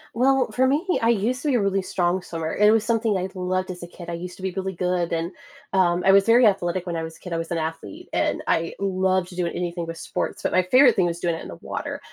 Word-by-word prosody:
Well, 260 Hz, 0 st, +2 dB
for 255 Hz, +4 st, +2 dB
me, 290 Hz, +7 st, +1 dB, 0.2 s
I 230 Hz, -, +3 dB
used 235 Hz, +4 st, +1 dB
to 300 Hz, -, -3 dB
be 275 Hz, -, +2 dB
a 235 Hz, -, +2 dB
really 195 Hz, -1 st, +1 dB
strong 180 Hz, 0 st, 0 dB
swimmer, 165 Hz, -2 st, -4 dB
it 210 Hz, +1 st, +5 dB
was 220 Hz, 0 st, +4 dB
something 225 Hz, -3 st, +1 dB
I 185 Hz, 0 st, -2 dB
loved 185 Hz, 0 st, -2 dB
as 180 Hz, -1 st, -9 dB
a 175 Hz, -, -7 dB
kid. 175 Hz, -1 st, -9 dB
I -, -, -4 dB
used 175 Hz, +1 st, -6 dB
to 190 Hz, -, -12 dB
be 190 Hz, -, -1 dB
really 190 Hz, +1 st, -3 dB
good, 180 Hz, -1 st, -1 dB
and, 165 Hz, +2 st, -1 dB, 0.4 s
um, 180 Hz, -2 st, +2 dB
I 195 Hz, -, +7 dB
was 195 Hz, 0 st, +5 dB
very 235 Hz, +2 st, +6 dB
athletic 185 Hz, -3 st, +1 dB
when 175 Hz, -2 st, -3 dB
I 165 Hz, -, -2 dB
was 160 Hz, 0 st, -7 dB
a -, -, -24 dB
kid, 180 Hz, -, -7 dB
I 165 Hz, -, 0 dB
was 165 Hz, 0 st, -4 dB
an 170 Hz, -, -1 dB
athlete, 160 Hz, -10 st, -5 dB
and -, -, 0 dB
I 165 Hz, 0 st, 0 dB
loved 185 Hz, -2 st, 0 dB
to 180 Hz, -, -11 dB
do 180 Hz, -1 st, -1 dB
it -, -, -4 dB
anything 175 Hz, -1 st, -3 dB
with 165 Hz, -, -6 dB
sports, -, -, -4 dB
but -, -, 0 dB
my 185 Hz, -, +4 dB
favorite 250 Hz, +7 st, +5 dB
thing 180 Hz, -2 st, +2 dB
was 170 Hz, 0 st, -3 dB
doing 170 Hz, -1 st, 0 dB
it 165 Hz, -, -5 dB
in -, -, -8 dB
the 85 Hz, -, -8 dB
water. -, -, -5 dB
185 Hz, 290 wpm, -24 LUFS, 175-205 Hz, 0.4 s, I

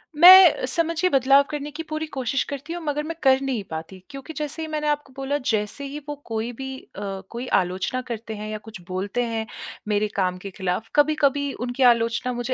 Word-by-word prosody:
मैं, 360 Hz, -1 st, +9 dB
समझिए 335 Hz, +6 st, 0 dB
बदलाव 275 Hz, 0 st, +5 dB
करने 295 Hz, -1 st, -4 dB
की 315 Hz, +2 st, -6 dB
पूरी 310 Hz, 0 st, -2 dB
कोशिश 265 Hz, -2 st, -1 dB
करती 285 Hz, +4 st, -5 dB
हूँ 345 Hz, -, -5 dB
मगर 295 Hz, 0 st, -1 dB
मैं 330 Hz, +2 st, -5 dB
कर 265 Hz, 0 st, +5 dB
नहीं 260 Hz, -6 st, -2 dB
पाती 160 Hz, +4 st, -7 dB
क्योंकि 275 Hz, +3 st, -8 dB
जैसे 300 Hz, +1 st, -3 dB
ही 315 Hz, -, -3 dB
मैंने 305 Hz, -1 st, -2 dB
आपको 295 Hz, -2 st, -1 dB
बोला 275 Hz, +1 st, -1 dB
जैसे 215 Hz, +5 st, -1 dB
ही 285 Hz, +2 st, -6 dB
वो 295 Hz, -, -3 dB
कोई 225 Hz, +1 st, -3 dB
भी 265 Hz, 0 st, -5 dB
अ, 195 Hz, -1 st, -7 dB
कोई 240 Hz, +2 st, -6 dB
आलोचना 185 Hz, +8 st, -3 dB
करते 225 Hz, -2 st, -5 dB
हैं 210 Hz, +1 st, -6 dB
या 215 Hz, -, -3 dB
कुछ 215 Hz, -4 st, -9 dB
बोलते 195 Hz, +6 st, -2 dB
हैं 225 Hz, -1 st, -2 dB, 0.4 s
मेरे 210 Hz, 0 st, +1 dB
काम 185 Hz, -2 st, 0 dB
के 195 Hz, +2 st, -8 dB
खिलाफ, 190 Hz, +3 st, -3 dB
कभी-कभी 290 Hz, -2 st, +2 dB
उनकी 245 Hz, +2 st, -2 dB
आलोचना 230 Hz, +2 st, -2 dB
मुझे 245 Hz, +1 st, -2 dB
265 Hz, 200 wpm, -24 LUFS, 220-295 Hz, 0.4 s, मैं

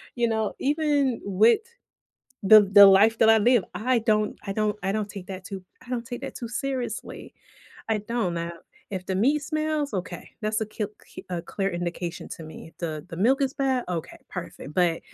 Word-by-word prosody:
you 240 Hz, -1 st, +1 dB
know, 220 Hz, -1 st, -1 dB
even 285 Hz, -3 st, +1 dB
wit 220 Hz, -, +3 dB, 0.8 s
the 215 Hz, +2 st, +9 dB
the 200 Hz, 0 st, +8 dB
life 210 Hz, +4 st, +5 dB
that 225 Hz, -, +6 dB
I 225 Hz, -, +7 dB
live, 240 Hz, -1 st, +4 dB
I 245 Hz, +2 st, +1 dB
don't 215 Hz, -2 st, +1 dB
I 195 Hz, -, -1 dB
don't 210 Hz, 0 st, 0 dB
I 195 Hz, -, -1 dB
don't 210 Hz, 0 st, -2 dB
take 190 Hz, -2 st, -9 dB
that 185 Hz, -1 st, -7 dB
too 195 Hz, -2 st, -7 dB, 0.2 s
I 245 Hz, -, -15 dB
don't 240 Hz, -2 st, -3 dB
take 245 Hz, +2 st, -6 dB
that 275 Hz, -, -6 dB
too 235 Hz, -, -5 dB
seriously. 245 Hz, -1 st, -4 dB, 0.6 s
I 220 Hz, -1 st, +1 dB
don't 210 Hz, -4 st, -2 dB
now, 170 Hz, 0 st, -3 dB, 0.4 s
if 185 Hz, -2 st, -5 dB
the 190 Hz, -, -2 dB
meat 280 Hz, +9 st, +2 dB
smells? 310 Hz, -3 st, -2 dB
Okay, 180 Hz, -2 st, -5 dB
that's 215 Hz, +1 st, 0 dB
a 220 Hz, -, -1 dB
c 215 Hz, -, -3 dB, 0.2 s
cl -, -, -11 dB
a 175 Hz, -1 st, -2 dB
clear 195 Hz, +2 st, -2 dB
indication 175 Hz, 0 st, -4 dB
to 165 Hz, -, -7 dB
me. 160 Hz, +1 st, -11 dB
The 155 Hz, -2 st, -5 dB
the 165 Hz, -, -8 dB
milk 250 Hz, +10 st, +3 dB
is 270 Hz, 0 st, 0 dB
bad? 265 Hz, -2 st, 0 dB
Okay, 170 Hz, -3 st, -4 dB
perfect, 150 Hz, -, -8 dB
but 175 Hz, -2 st, +2 dB
215 Hz, 200 wpm, -25 LUFS, 185-245 Hz, 0.8 s, the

